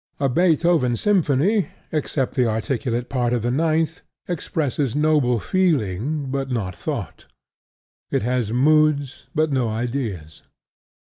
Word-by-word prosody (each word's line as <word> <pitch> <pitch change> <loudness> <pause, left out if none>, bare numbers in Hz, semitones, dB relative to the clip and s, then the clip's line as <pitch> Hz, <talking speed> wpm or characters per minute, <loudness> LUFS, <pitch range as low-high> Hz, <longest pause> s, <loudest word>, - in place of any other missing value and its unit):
A 140 - +2
Beethoven 165 -4 +3
symphony 190 - +2 0.2
(except 145 -3 -1
the 125 -2 +2
articulate 120 +1 -2
part 125 -3 0
of 120 -3 0
the 120 - 0
ninth) 160 +3 0 0.3
expresses 145 -6 -2
noble 150 -5 +3
feeling, 145 - 0
but 135 -1 -2
not 105 -7 -2
thought: - - -5 0.8
it - - 0
has 120 -2 0
moods, 145 +1 +2
but 155 -1 +2
no 130 -4 +1
ideas. 110 - -4
135 Hz, 120 wpm, -22 LUFS, 120-155 Hz, 0.8 s, Beethoven